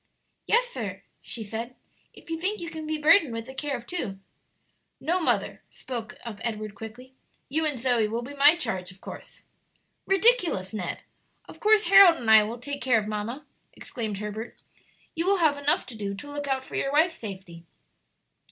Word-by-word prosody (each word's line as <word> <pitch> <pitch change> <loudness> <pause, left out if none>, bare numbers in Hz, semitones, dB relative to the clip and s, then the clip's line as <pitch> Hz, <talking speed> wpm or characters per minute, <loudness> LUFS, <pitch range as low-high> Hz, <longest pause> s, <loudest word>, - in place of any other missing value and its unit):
"Yes, - - +4
sir," - - -6 0.2
she 230 - -4
said, 230 +4 -5 0.4
"if - - -14
you 325 - -2
think 410 +4 -1
you 335 -1 -6
can 315 -1 -6
be 310 0 -1
burdened 305 - +5
with 230 0 -4
the 265 - -10
care 280 0 -2
of 240 - -12
two." 230 - -4 0.8
"No, 345 +6 0
mother," - - 0
spoke 235 -4 -7
up 220 -4 -7
Edward, 215 -3 -4
quickly; 225 +5 -10 0.4
"you 315 +4 0
and 290 -4 -2
Zoe 240 -3 +2
will 230 +3 -3
be 270 +4 -8
my 285 +3 +6
charge, 190 - -4
of 185 - -18
course." - - -11 0.6
"Ridiculous, 385 - +3
Ned! 185 -5 -4 0.4
of - - -13
course, 430 0 +4
Harold 390 -2 +8
and 230 -7 0
I 220 -1 +10
will 220 +3 -3
take 280 +3 -6
care 250 -2 +3
of 215 - -1
mamma," 220 +7 -4 0.3
exclaimed 220 -6 -5
Herbert. 210 +3 -6 0.6
"You 330 +2 -2
will 395 0 +4
have 315 -5 +3
enough 285 +1 +1
to 250 - -9
do 200 -2 -4
to 290 +8 -9
look 290 0 -4
out 265 -1 0
for - - -14
your 275 - -1
wife's 325 +3 +2
safety." 190 -5 -8
255 Hz, 190 wpm, -26 LUFS, 220-315 Hz, 0.8 s, I